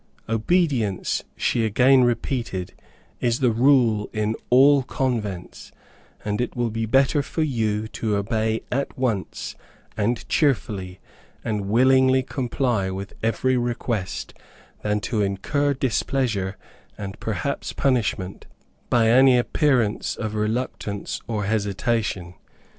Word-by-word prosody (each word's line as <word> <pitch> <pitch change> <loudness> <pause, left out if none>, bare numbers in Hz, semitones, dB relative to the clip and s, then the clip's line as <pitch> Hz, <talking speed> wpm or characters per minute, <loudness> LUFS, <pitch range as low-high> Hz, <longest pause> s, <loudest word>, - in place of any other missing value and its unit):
"Obedience," 115 - +1
she 115 - +1
again 125 +4 +5
repeated, 115 -6 -1 0.5
"is 120 0 +1
the 125 -3 +3
rule 115 -3 +3
in 110 +1 -1
all 135 +3 +6
convents, 115 -9 -3 0.5
and 105 +2 -1
it 125 - -3
will 120 -2 -1
be 115 0 -2
better 135 +5 +3
for 155 +3 -2
you 110 -6 -1
to 110 -1 -2
obey 110 +2 0
at 140 +2 -2
once, 115 -7 -2 0.4
and 110 +2 -1
cheerfully, 100 - 0 0.4
and 105 -3 -2
willingly 130 +3 +4
comply 120 -6 -1
with 95 +1 -6
every 130 +3 +1
request, 120 -5 -2 0.5
than 105 0 0
to 110 +1 -1
incur 140 +9 0
displeasure 125 -6 -1 0.4
and 100 -1 -7
perhaps 110 +6 -3
punishment, 110 -8 -1 0.4
by 115 -2 +4
any 130 +2 +6
appearance 120 -3 +1
of 110 -1 -4
reluctance 105 -2 -3
or 110 -3 -2
hesitation. 100 -3 -1
115 Hz, 115 wpm, -23 LUFS, 105-130 Hz, 0.5 s, all